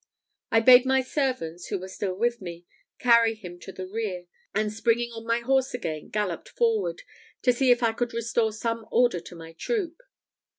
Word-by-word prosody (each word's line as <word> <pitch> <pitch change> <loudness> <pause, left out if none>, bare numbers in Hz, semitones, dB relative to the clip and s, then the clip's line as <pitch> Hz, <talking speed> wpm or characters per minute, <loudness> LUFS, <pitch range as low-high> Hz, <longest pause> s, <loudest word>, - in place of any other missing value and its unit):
I 225 - +4
bade 250 +1 +8
my 265 0 +3
servants, 255 - -2
who - - -2
were 185 0 -7
still 190 0 -4
with 235 +3 0
me, 175 -1 -8 0.3
carry 235 -2 +4
him 180 -5 -10
to 190 - -9
the 185 0 -7
rear; 190 -3 -4 0.3
and 215 0 0
springing 235 +2 +1
on 225 0 -9
my 230 +1 +1
horse 265 +1 +1
again, 155 -10 -5
galloped 205 -5 -3
forward, 460 0 0 0.4
to 250 - +4
see 255 +1 +2
if 245 0 +4
I 225 -1 +3
could 240 +1 -2
restore 230 -1 0
some 230 +1 -3
order 240 -6 +3
to 175 +1 -12
my 165 -1 -11
troop. 350 - -3
230 Hz, 185 wpm, -26 LUFS, 185-245 Hz, 0.4 s, bade